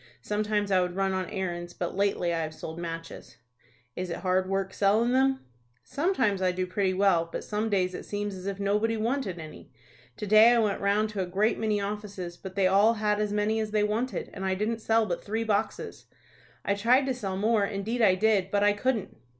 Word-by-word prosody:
Sometimes 210 Hz, -1 st, -1 dB
I 185 Hz, -1 st, +4 dB
would 180 Hz, 0 st, -2 dB
run 195 Hz, 0 st, 0 dB
on 185 Hz, -1 st, -2 dB
errands, 175 Hz, -4 st, -4 dB
but 175 Hz, -, -4 dB
lately 195 Hz, -3 st, +1 dB
I 165 Hz, -, -1 dB
have 155 Hz, 0 st, -5 dB
sold 160 Hz, +1 st, -7 dB
matches." 165 Hz, -7 st, -7 dB, 0.6 s
"Is 185 Hz, 0 st, -4 dB
it 170 Hz, -, -5 dB
hard 185 Hz, 0 st, +1 dB
work 195 Hz, 0 st, -1 dB
sellin' 215 Hz, +4 st, +2 dB
them?" 265 Hz, +1 st, +2 dB, 0.4 s
"Sometimes 265 Hz, -, 0 dB
I 185 Hz, -1 st, +2 dB
do 185 Hz, 0 st, -2 dB
pretty 185 Hz, 0 st, 0 dB
well, 185 Hz, -4 st, +2 dB
but -, -, -4 dB
some 215 Hz, +1 st, -2 dB
days 185 Hz, -3 st, +1 dB
it -, -, -6 dB
seems 205 Hz, 0 st, -4 dB
as 185 Hz, 0 st, -7 dB
if 200 Hz, -1 st, -4 dB
nobody 210 Hz, +3 st, +1 dB
wanted 230 Hz, -4 st, -1 dB
any. 155 Hz, -4 st, -10 dB, 0.5 s
To -, -, -4 dB
day 215 Hz, +3 st, +7 dB
I -, -, +3 dB
went 210 Hz, -3 st, +1 dB
round 205 Hz, +2 st, +2 dB
to 205 Hz, -2 st, -3 dB
a 185 Hz, -, -2 dB
great 200 Hz, +5 st, +1 dB
many 215 Hz, -2 st, 0 dB
offices, 200 Hz, -3 st, -5 dB
but 190 Hz, +1 st, -10 dB
they 195 Hz, -1 st, +2 dB
all 200 Hz, +5 st, +4 dB
had 210 Hz, -1 st, 0 dB
as 210 Hz, -1 st, -1 dB
many 210 Hz, +1 st, +1 dB
as 215 Hz, -1 st, -2 dB
they 210 Hz, 0 st, +1 dB
wanted, 225 Hz, +5 st, -2 dB
and 195 Hz, -, -6 dB
I 190 Hz, 0 st, 0 dB
didn't 220 Hz, +3 st, -2 dB
sell 225 Hz, 0 st, +2 dB
but 175 Hz, -4 st, -3 dB
three 220 Hz, +2 st, -2 dB
boxes. 215 Hz, -1 st, -2 dB, 0.6 s
I 200 Hz, -, +2 dB
tried 240 Hz, +7 st, +3 dB
to 265 Hz, -, 0 dB
sell 195 Hz, -6 st, -4 dB
more, 215 Hz, +1 st, +2 dB
indeed 210 Hz, +4 st, -2 dB
I 195 Hz, -4 st, +5 dB
did, 200 Hz, -1 st, +2 dB
but 205 Hz, +1 st, +1 dB
I 205 Hz, 0 st, +4 dB
couldn't." 225 Hz, 0 st, -2 dB
200 Hz, 215 wpm, -28 LUFS, 185-220 Hz, 0.6 s, day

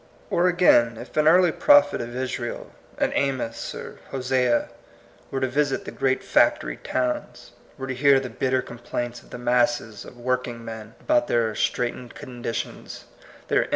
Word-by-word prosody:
Or 175 Hz, +1 st, +3 dB
again, 145 Hz, -11 st, +4 dB
if -, -, -10 dB
an 155 Hz, 0 st, +3 dB
early 175 Hz, +1 st, +6 dB
prophet 290 Hz, -, +5 dB
of 120 Hz, +1 st, -6 dB
Israel, 125 Hz, -2 st, -4 dB, 0.3 s
an -, -, +1 dB
Amos 130 Hz, -4 st, -2 dB
or -, -, -9 dB
Hosea, 125 Hz, -2 st, +1 dB, 0.6 s
were 135 Hz, -, -2 dB
to 130 Hz, -, +2 dB
visit 140 Hz, +1 st, 0 dB
the -, -, -6 dB
great 135 Hz, -1 st, 0 dB
factory -, -, +2 dB
towns, 125 Hz, -1 st, -3 dB, 0.3 s
were 135 Hz, -, -5 dB
to 130 Hz, -, -3 dB
hear 140 Hz, +1 st, +5 dB
the 130 Hz, -, -5 dB
bitter 130 Hz, +2 st, 0 dB
com* 120 Hz, -, -10 dB
plaints 120 Hz, 0 st, -4 dB
of -, -, -20 dB
the -, -, -7 dB
masses 120 Hz, -2 st, 0 dB
of 125 Hz, -, -13 dB
working 120 Hz, -1 st, -2 dB
men 110 Hz, -1 st, -8 dB
about 305 Hz, 0 st, +2 dB
their 115 Hz, -2 st, +1 dB
straitened 120 Hz, +2 st, -2 dB
conditions, 120 Hz, -2 st, -6 dB, 0.4 s
their -, -, +3 dB
in. -, -, -4 dB
125 Hz, 165 wpm, -24 LUFS, 120-135 Hz, 0.6 s, early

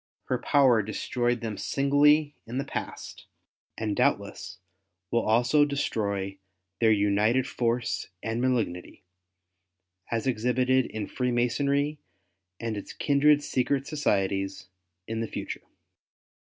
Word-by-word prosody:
Her 125 Hz, -, +1 dB
power 130 Hz, -5 st, +4 dB
destroyed 120 Hz, +3 st, -1 dB
them 110 Hz, -3 st, -4 dB
singly 145 Hz, +2 st, +3 dB
in 120 Hz, +3 st, -5 dB
the 135 Hz, -, 0 dB
past, -, -, -6 dB, 0.5 s
and 105 Hz, -2 st, -2 dB
doubtless 100 Hz, -2 st, -1 dB, 0.5 s
will 115 Hz, -, +2 dB
also 120 Hz, +7 st, +3 dB
destroy 100 Hz, -9 st, -2 dB, 0.4 s
their 115 Hz, -1 st, +4 dB
united 105 Hz, +4 st, +2 dB
force 120 Hz, -1 st, -1 dB, 0.2 s
and 115 Hz, +2 st, -2 dB
malignity, 115 Hz, -9 st, -1 dB, 1.1 s
as 115 Hz, +1 st, -1 dB
exhibited 125 Hz, +1 st, +2 dB
in 110 Hz, -, -4 dB
Free 125 Hz, -1 st, -2 dB
masonry 140 Hz, +5 st, +1 dB, 0.6 s
and 115 Hz, -2 st, -3 dB
its 100 Hz, -, -7 dB
kindred 145 Hz, +1 st, +3 dB
secret 135 Hz, +1 st, 0 dB
societies, 95 Hz, -, -1 dB, 0.4 s
in 115 Hz, 0 st, -3 dB
the 115 Hz, -, -2 dB
future. -, -, -5 dB
120 Hz, 110 wpm, -27 LUFS, 110-140 Hz, 1.1 s, power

